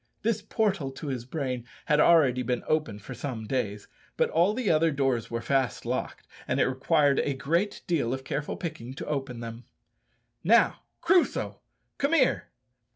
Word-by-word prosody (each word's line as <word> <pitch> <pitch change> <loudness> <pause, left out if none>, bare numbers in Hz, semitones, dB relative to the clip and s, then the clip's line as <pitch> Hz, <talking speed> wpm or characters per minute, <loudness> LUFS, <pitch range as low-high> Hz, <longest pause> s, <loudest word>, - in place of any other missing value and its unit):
This 220 -1 +1
portal 200 -8 0
to 145 - -7
his 125 -3 -4
brain 130 -3 -3 0.2
had 150 0 +3
already 145 -7 +5
been 125 -1 -1
open 155 -9 0
for 105 - -9
some 120 -6 -5
days; 105 -4 -2 0.3
but - - +2
all 175 +6 +3
the 250 -3 -2
other 165 +1 +4
doors 135 -5 0
were 115 0 -3
fast 135 -3 0
locked, - - -3 0.2
and - - 0
it - - +4
required 140 +2 +2
a 140 - 0
great 170 +10 -1
deal 150 -9 0
of 130 0 -3
careful 145 +2 -3
picking 135 -7 -6
to - - -6
open 135 -5 -3
them. 115 +1 -7 0.8
"Now, - - +4 0.2
Crusoe, 350 +1 +2 0.4
come 280 +3 +1
here." 270 -6 +3
140 Hz, 165 wpm, -28 LUFS, 125-165 Hz, 0.8 s, already